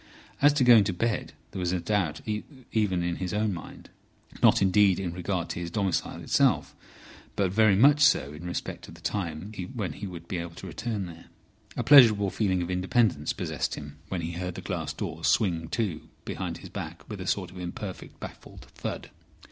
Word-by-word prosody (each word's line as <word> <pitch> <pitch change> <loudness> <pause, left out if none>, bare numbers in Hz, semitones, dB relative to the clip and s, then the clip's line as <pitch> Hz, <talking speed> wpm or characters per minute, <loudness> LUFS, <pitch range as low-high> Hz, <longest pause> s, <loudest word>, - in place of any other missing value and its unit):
As 145 +1 +7
to 145 - +2
going 120 -4 +8
to 95 - -1
bed, 115 +5 -1 0.2
there 95 - -5
was 90 -1 0
a 90 - 0
doubt 90 -4 -1 0.5
even 95 -5 +1
in 85 -1 -1
his 90 +1 -3
own 105 -1 +1
mind. 85 - -10 0.5
Not - - +6
indeed 95 -1 +4
in 90 -3 -3
regard 90 -1 -2
to - - -4
his 85 -1 -4
domicile 95 -1 -1
itself, - - +2 0.6
but 95 -3 +1
very 110 0 +5
much 145 +8 +6
so 70 - +4
in 80 +4 -8
respect 90 - -5
of 80 - -12
the 85 - -16
time 85 +1 -3 0.2
when 105 -6 -2
he 100 - -6
would 85 -2 -9
be 90 - -3
able 85 0 -6
to - - -9
return 110 -5 -3
there. 85 -1 -11 0.5
A - - 0
pleasurable 110 -9 +7
feeling 95 -4 +1
of 85 - -4
independence 90 -3 +1
possessed - - -2
him 75 0 -9
when 95 -3 -2
he 85 +1 -3
heard 90 +1 -4
the - - -6
glass - - -3
doors - - -3
swing 85 -6 +2
to 90 -5 -2 0.2
behind - - -4
his - - -11
back - - -7
with - - -6
a - - -6
sort 90 -3 -1
of 90 - -10
imperfect 90 +2 -7
baffled - - -10
thud. - - -5
95 Hz, 195 wpm, -28 LUFS, 85-105 Hz, 0.6 s, going